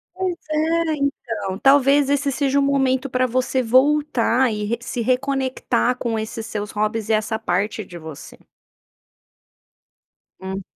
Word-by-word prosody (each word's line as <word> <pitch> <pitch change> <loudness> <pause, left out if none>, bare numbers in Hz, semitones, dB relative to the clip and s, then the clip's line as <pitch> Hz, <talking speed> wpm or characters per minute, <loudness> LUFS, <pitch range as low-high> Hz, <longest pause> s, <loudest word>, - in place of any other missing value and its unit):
Pois 370 -2 -2
é, 320 +1 +1
então, 230 -8 -3
talvez 275 +1 +4
esse 285 0 +1
seja 280 +1 +1
um - - +3
momento 270 -1 +1
para 255 0 +1
você 255 +1 0
voltar 260 -1 +2
e 210 -1 -3
re 230 +3 -1
se 245 -1 -4
reconectar 255 -1 0
com 230 -3 -2
esses 220 +1 -5
seus 210 -2 -5
hobbies 215 +1 -2
e - - +3
essa 215 +1 0
parte 210 +1 -1
de 175 - -10
você. 160 -3 -10 2.0
Hum. 190 +1 -5
255 Hz, 140 wpm, -21 LUFS, 220-280 Hz, 2.0 s, talvez